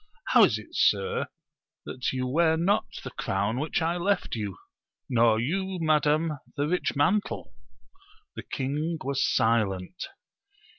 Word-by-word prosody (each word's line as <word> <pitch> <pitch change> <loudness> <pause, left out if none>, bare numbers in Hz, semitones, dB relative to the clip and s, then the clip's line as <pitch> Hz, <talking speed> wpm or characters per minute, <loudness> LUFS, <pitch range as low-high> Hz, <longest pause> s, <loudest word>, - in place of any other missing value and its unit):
How - - +7
is - - 0
it, - - -11
sir, 470 0 +2 0.6
that 125 - -3
you 130 -1 -2
wear 160 +5 +2
not 190 +5 +2 0.2
the - - -6
crown 100 +5 -1
which 155 +3 -1
I 170 +2 0
left 195 +2 0
you; 105 -4 -4 0.5
nor 115 -3 +3
you, 190 +9 -1
madam, 155 -1 +2 0.2
the 145 +1 +1
rich 180 0 0
mantle? 185 +9 0 0.8
The - - -5
king 150 +5 -2
was 140 0 0
silent. 110 - 0
150 Hz, 135 wpm, -27 LUFS, 120-170 Hz, 0.8 s, How